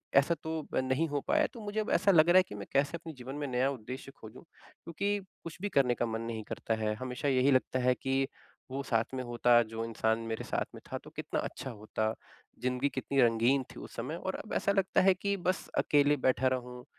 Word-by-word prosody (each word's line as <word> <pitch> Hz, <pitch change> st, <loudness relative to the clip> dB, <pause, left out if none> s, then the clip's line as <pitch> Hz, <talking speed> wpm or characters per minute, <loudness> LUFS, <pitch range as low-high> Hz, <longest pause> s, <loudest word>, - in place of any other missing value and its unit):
ऐसा 140 Hz, +5 st, +5 dB
तो 160 Hz, -1 st, -3 dB
नहीं 130 Hz, +5 st, +1 dB
हो 145 Hz, -1 st, -1 dB
पाया। 310 Hz, 0 st, +3 dB
तो 235 Hz, -, -9 dB
मुझे 210 Hz, +1 st, -3 dB
अब -, -, -4 dB
ऐसा 200 Hz, +1 st, +4 dB
लग 165 Hz, -1 st, +6 dB
रहा 180 Hz, -, +7 dB
है 185 Hz, -, +7 dB
कि -, -, -7 dB
मैं 100 Hz, -1 st, -7 dB
कैसे 140 Hz, +4 st, +2 dB
अपने 165 Hz, -1 st, -9 dB
जीवन 130 Hz, +1 st, -8 dB
में 145 Hz, -1 st, -3 dB
नया 130 Hz, +1 st, +1 dB
उद्देश्य 130 Hz, +2 st, -7 dB
खोजूँ? 110 Hz, +6 st, -11 dB
क्योंकि 200 Hz, +5 st, -4 dB, 0.3 s
कुछ 165 Hz, -, -7 dB
भी 205 Hz, -, -1 dB
करने 135 Hz, -8 st, +3 dB
का -, -, 0 dB
मन 115 Hz, 0 st, -3 dB
नहीं 115 Hz, -1 st, -4 dB
करता 110 Hz, -, -3 dB
है, 110 Hz, -1 st, -1 dB
हमेशा 130 Hz, +5 st, -4 dB
यही 135 Hz, 0 st, +4 dB
लगता 130 Hz, 0 st, +2 dB
है 125 Hz, 0 st, +3 dB
कि 135 Hz, 0 st, +1 dB, 0.4 s
वो 135 Hz, +1 st, -2 dB
साथ 115 Hz, 0 st, 0 dB
में 130 Hz, -, -2 dB
होता 120 Hz, 0 st, +4 dB
जो 115 Hz, 0 st, -5 dB
इंसान 110 Hz, 0 st, 0 dB
मेरे 110 Hz, -, -3 dB
साथ -, -, -1 dB
में -, -, -10 dB
था -, -, -1 dB
तो -, -, -11 dB
कितना -, -, -2 dB
अच्छा 135 Hz, -, -5 dB
होता, 110 Hz, 0 st, -2 dB, 0.5 s
ज़िंदगी 125 Hz, +2 st, +1 dB
कितनी 135 Hz, 0 st, 0 dB
रंगीन 120 Hz, +3 st, +3 dB
थी -, -, -10 dB
उस -, -, -10 dB
समय 130 Hz, +8 st, -3 dB
और 190 Hz, +2 st, -4 dB
अब 215 Hz, -, -7 dB
ऐसा 200 Hz, -, +2 dB
लगता 195 Hz, -1 st, +2 dB
है 190 Hz, 0 st, +6 dB
कि 200 Hz, +2 st, -1 dB
बस 185 Hz, +1 st, -1 dB
अकेले 145 Hz, 0 st, +4 dB
बैठा 130 Hz, 0 st, +3 dB
रहूँ 125 Hz, -1 st, -3 dB
135 Hz, 230 wpm, -31 LUFS, 120-160 Hz, 0.5 s, रहा